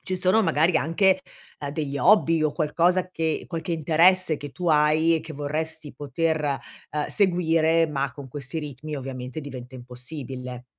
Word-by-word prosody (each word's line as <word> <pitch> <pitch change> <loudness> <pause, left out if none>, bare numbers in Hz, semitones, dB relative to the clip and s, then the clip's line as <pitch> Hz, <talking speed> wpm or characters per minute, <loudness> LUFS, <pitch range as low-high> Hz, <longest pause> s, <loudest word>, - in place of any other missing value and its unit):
ci 185 - -2
sono 185 +5 +3
magari 165 -1 +3
anche, 185 +5 +2 0.4
uhm, 145 - -4
degli 145 -2 -3
hobby 165 -5 +4
o 155 - +1
qualcosa 170 +4 +1
che 160 -3 -2
qualche 170 +1 -4
interesse 165 +1 +4
che 145 0 -8
tu 175 +4 -3
hai 155 +2 +4
e - - -3
che 160 0 -9
vorresti 155 +1 -3
poter, 145 +1 -1 0.3
uhm, 150 -1 -2
seguire, 165 -4 +3
ma 140 -2 -2
con 140 -2 -10
questi 135 +3 -5
ritmi 150 0 -6
ovviamente 130 +1 -6
diventa 130 -3 -9
impossibile. 125 0 -6
155 Hz, 155 wpm, -25 LUFS, 140-165 Hz, 0.4 s, hobby